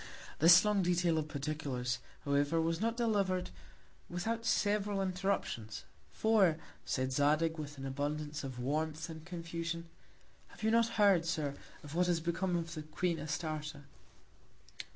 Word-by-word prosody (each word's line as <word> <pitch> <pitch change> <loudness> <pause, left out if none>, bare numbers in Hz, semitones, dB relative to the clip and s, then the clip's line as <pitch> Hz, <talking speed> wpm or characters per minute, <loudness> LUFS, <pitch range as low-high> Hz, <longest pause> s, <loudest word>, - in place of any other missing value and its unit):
This 170 +5 +8
long 210 -2 +3
Detail 175 -2 +2
of 155 - -3
Particulars, 140 -4 -2 0.3
however, 145 +3 +2
was 165 +1 0
not 230 +1 0
deliver'd 200 -6 +1 0.6
without 225 +6 -2
several 205 -1 +1
Interruptions; 185 - -2 0.3
for, 195 - +3 0.3
said 130 0 -1
Zadig, 155 +4 +2
with 145 -1 -6
Abundance 145 +3 -3
of 130 -2 -5
Warmth 155 +5 -2
and 160 -1 -9
Confusion, 170 -1 -5 0.6
Have - - -14
you 220 - +3
never 230 0 +3
heard, 195 -6 +4
Sir, 155 -5 -1 0.3
of 145 0 -9
what 180 +2 +2
is 175 -2 +2
become 170 +2 -1
of 165 -1 -2
the 155 - -5
Queen 165 +2 -1
Astarte? 150 -2 -4
165 Hz, 135 wpm, -34 LUFS, 150-185 Hz, 0.6 s, This